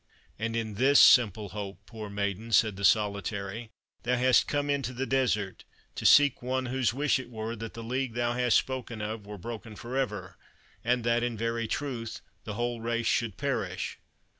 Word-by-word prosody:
"And 115 +1 -2
in 110 -2 -2
this 140 +2 +6
simple 110 -5 +6
hope, 100 0 -6
poor 110 -3 -8
maiden," 100 +2 -3
said 110 -2 +4
the 100 - -7
Solitary, 100 +1 0 0.3
"thou 125 +1 +1
hast 125 0 +4
come 145 0 0
into 140 -3 -1
the 130 +2 -2
desert, 115 -8 0 0.3
to - - +1
seek 145 -2 +6
one 130 +1 -1
whose 130 -1 +1
wish 140 +2 +1
it 125 -2 -8
were 110 0 -4
that 115 +1 -7
the 115 - -7
league 125 0 -2
thou 120 0 0
hast 125 -1 +3
spoken 125 -3 -3
of 105 0 -5
were 105 0 -7
broken 110 +2 -7
for 120 +5 -7
ever, 135 -1 -2 0.5
and 120 0 +1
that, 120 0 +2
in 120 -2 -2
very 115 +1 -1
truth, 120 -4 -4 0.2
the 105 - -5
whole 120 0 -2
race 115 0 -1
should 115 -4 0
perish? - - -2
115 Hz, 185 wpm, -29 LUFS, 110-125 Hz, 0.5 s, this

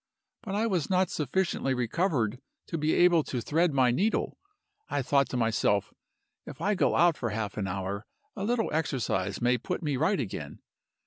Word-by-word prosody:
But 210 -4 -4
I 215 +2 +1
was 185 -9 0
not 185 0 +2
sufficiently 150 -2 0
recovered 125 - 0 0.2
to 165 - -4
be 155 +1 +1
able 175 -3 +5
to 125 - -3
thread 160 +8 +1
my 130 -3 +3
needle. 200 - 0 0.5
I 140 - -1
thought 140 0 +2
to 125 - -2
myself, 110 -3 +1 0.5
'If - - -9
I 200 +6 +1
go 195 - +2
out 170 -2 +4
for 120 - -2
half 105 -2 -3
an 100 -3 -2
hour, 95 +2 -4 0.3
a 195 - -4
little 225 -3 0
exercise 135 -10 -1
may 125 0 +3
put 180 +9 -4
me 145 -3 0
right 170 +8 +2
again. 110 -7 -5
140 Hz, 180 wpm, -28 LUFS, 120-180 Hz, 0.5 s, able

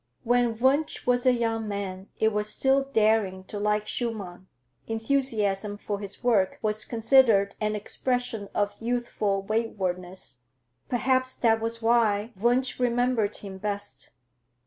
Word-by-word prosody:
When 240 -1 +2
Wunsch 275 +5 +1
was 245 +1 +2
a - - +7
young 225 -2 -1
man, 195 -2 -5
it 220 0 +2
was 210 0 -1
still 270 +4 +2
daring 215 -6 +1
to 205 +2 -7
like 210 0 0
Schumann; 200 -7 -4 0.4
enthusiasm 220 -4 -1
for 205 -1 -4
his 200 +3 -8
work 215 -6 +2
was 215 0 0
considered 225 -4 +4
an 215 0 0
expression 225 -1 -2
of 205 0 +1
youthful 225 -4 -1
waywardness. 185 - -3 0.5
Perhaps 255 +1 +1
that 225 -2 +2
was 230 0 -4
why 225 -1 +2
Wunsch 245 +7 +1
remembered 245 -3 +1
him 195 -2 -8
best. 205 0 -5
220 Hz, 130 wpm, -26 LUFS, 205-245 Hz, 0.5 s, a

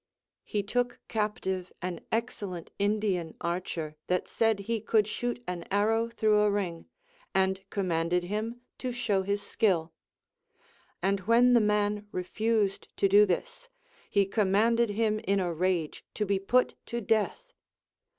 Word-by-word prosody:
He 205 -1 -2
took 245 +4 -1
captive 190 -4 -2
an 180 -2 -4
excellent 205 -6 -3
Indian 200 -5 0
archer 170 -3 -3
that 180 0 0
said 225 -3 +1
he 225 +2 -2
could 215 0 +3
shoot 240 +2 -3
an 180 -1 -4
arrow 220 +3 +2
through 215 -2 +2
a 210 0 +4
ring, 185 -5 -2 0.5
and 190 0 +2
com 195 -3 -2
manded 170 +2 +1
him 215 +6 -3 0.2
to 255 - -2
show 215 -5 0
his 200 +1 -1
skill; 180 -6 +1 1.1
and 195 +1 +2
when 245 +2 +6
the 235 - +6
man 210 0 +1
refused 205 +2 0
to 195 - +4
do 205 +2 +6
this, - - -3 0.5
lie 200 -1 +5
commanded 215 +3 +2
him 215 +1 +1
in 200 -2 +1
a 175 -2 -1
rage 175 -2 -1
to 210 - 0
be 200 -1 +1
put 250 +6 +2
to 235 - -2
death. 225 - 0
205 Hz, 145 wpm, -29 LUFS, 185-225 Hz, 1.1 s, when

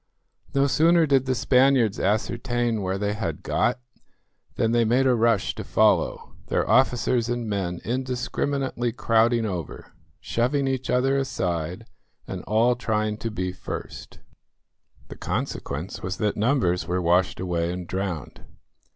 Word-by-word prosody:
No 140 0 +4
sooner 165 +4 +4
did 135 -3 +2
the 130 - +1
Spaniards 125 -4 +3
ascertain 115 +2 0
where 95 0 -1
they 105 +1 -1
had 95 -8 -4
got, 125 +2 0 0.8
than 115 - +1
they 120 0 +3
made 125 +4 +2
a 130 - +4
rush 115 -3 +2
to - - -6
follow; - - +1
their - - 0
officers 125 -2 +2
and 120 -1 -2
men 95 -4 -2
indiscriminately 130 0 -2
crowding 115 0 +2
over, 90 -7 -6 0.3
shoving 135 +4 0
each 130 -1 -2
other 135 +2 +2
aside, 90 -10 -3 0.4
and - - -6
all 115 +3 +3
trying 110 -3 -1
to 115 - -4
be 95 -4 -3
first. 90 - -8 0.9
The - - -9
consequence 75 +7 -4
was 95 +1 -4
that 105 -2 0
numbers 105 -6 +1
were 90 +1 0
washed 90 +1 +2
away 85 -2 -1
and 90 0 -5
drowned. 90 -5 -4
115 Hz, 140 wpm, -24 LUFS, 95-125 Hz, 0.9 s, No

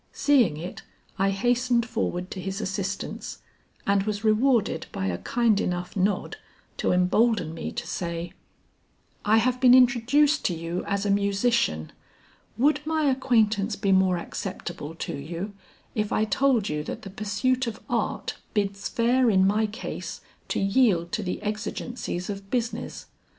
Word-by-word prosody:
Seeing 245 - +3
it, 175 +4 -7 0.4
I 195 0 +3
hastened 240 +4 +2
forward 185 -6 -2
to 185 - -5
his 195 +2 -4
assistance 195 -1 -4 0.5
and 200 0 +3
was 205 +1 -3
rewarded 225 +1 +2
by 95 - -3
a 90 -2 -1
kind 230 -4 +2
enough 180 0 -3
nod 195 +1 0 0.4
to - - +1
embolden 180 -1 +2
me 165 - -5
to - - -4
say, 170 -1 -4 0.9
"I 215 +2 +4
have 250 +3 +1
been 250 -1 +8
introduced 270 +4 +4
to 175 - +1
you 165 +2 -3
as 200 0 -1
a 200 - +2
musician; 200 - +1 0.7
would 295 +4 +3
my 315 0 0
acquaintance 225 -5 +2
be 195 -1 0
more 190 -1 +4
acceptable 175 -4 -6
to - - -4
you 170 +8 -5 0.4
if 210 -1 -1
I 215 - +2
told 240 0 +2
you 150 0 -2
that - - -6
the 195 - -8
pursuit 240 +6 0
of 225 -1 -4
art - - -2 0.2
bids 200 -1 -1
fair 245 +1 +3
in 190 -3 +4
my 215 +2 +2
case 220 +5 -6 0.3
to - - -1
yield 195 -5 +2
to 220 - -1
the 180 -3 -3
exigencies 210 -2 -4
of 195 -1 -6
business? 240 -1 -3
205 Hz, 150 wpm, -26 LUFS, 185-240 Hz, 0.9 s, been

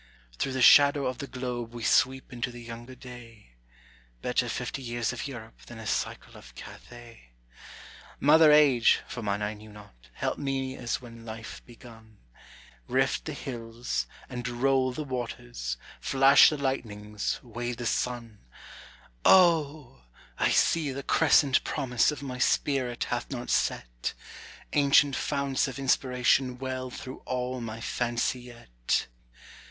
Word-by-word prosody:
Through 135 - -1
the 130 -1 +1
shadow 140 +2 +7
of 130 -1 -3
the 140 - -5
globe 120 -2 -5
we 120 - -6
sweep 130 +2 +2
into 120 0 -3
the 120 -1 -10
younger 120 +2 -9
day: 115 - -13 0.7
Better - - 0
fifty 135 - -4
years 120 -2 -2
of - - -5
Europe 115 -4 -10
than 120 - -10
a 110 - -9
cycle - - -3
of - - -14
Cathay. 115 - -13 0.9
Mother 155 +2 +6
age, 140 -6 +5
(for 120 - -6
mine 105 -1 -2
I 105 +1 -2
knew 110 +1 -13
not,) 80 -14 -16
help - - -3
me 135 -2 -2
as 120 - -3
when 115 -2 -12
life 115 0 -8
begun, 115 -3 -15 0.7
Rift - - 0
the - - -4
hills 115 - -4 0.2
and 125 -1 -5
roll 130 +2 +1
the 150 +5 -5
waters, 60 - -5 0.2
flash 135 +1 +6
the 150 - -3
lightnings, 105 -7 -3
weigh 120 0 -4
the 120 0 -6
sun, 115 -2 -2 0.8
O, 155 - +3 0.3
I - - +3
see 155 -4 +2
the 135 +1 -6
crescent 145 -3 +4
promise 125 -5 +1
of 145 -2 -4
my 125 -2 -6
spirit 125 -2 +1
hath 120 - -3
not 125 -3 -5
set; - - -1 0.6
Ancient 140 -1 +4
founts 140 -2 0
of 135 - -6
inspiration 125 -1 +1
well 130 0 -4
through 130 +1 -8
all 125 0 -3
my 115 -1 -6
fancy 120 +2 -1
yet. 115 - -3
125 Hz, 140 wpm, -28 LUFS, 115-135 Hz, 0.9 s, shadow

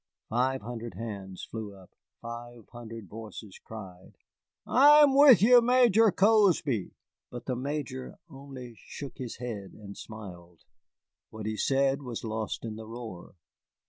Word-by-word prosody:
Five 130 +2 0
hundred 120 0 -7
hands 100 -5 -7
flew 110 -3 -7
up, 95 -2 -17 0.3
five 120 -1 -9
hundred 115 -3 -9
voices 105 -2 -10
cried, 95 -5 -11 0.5
"I'm 290 +1 +6
with 270 - +8
ye, 245 +2 +8
Major 235 -3 +5
Cozby!" 185 - +2 0.3
But 120 0 -8
the 130 - -2
Major 135 0 -5
only 135 -5 -10
shook 140 +5 -9
his 125 -3 -5
head 110 -6 -6
and 100 -2 -11
smiled. 90 -6 -11 0.7
What 110 -1 -8
he 110 0 -2
said 135 +4 +1
was 125 -4 -6
lost 110 0 -4
in 110 -1 -6
the 110 -1 -9
roar. 115 -7 -9
120 Hz, 135 wpm, -28 LUFS, 110-140 Hz, 0.7 s, with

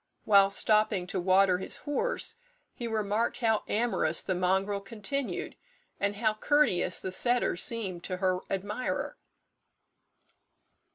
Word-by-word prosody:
Whilst 200 -1 +5
stopping 215 -4 +2
to 185 +1 -3
water 185 0 +4
his 190 - -3
horse, 460 +12 -1 0.4
he 240 - -5
remarked 220 +1 0
how 225 -2 +2
amorous 210 -8 +1
the 190 - -1
mongrel 190 +3 0
continued, 225 +7 -4 0.4
and 200 0 0
how 215 +1 +1
courteous 260 -4 +2
the 185 - -5
setter 240 +4 +1
seemed 190 -4 -3
to 185 - -3
her 185 -1 +1
admirer. 205 +6 -3
205 Hz, 120 wpm, -29 LUFS, 185-230 Hz, 0.4 s, Whilst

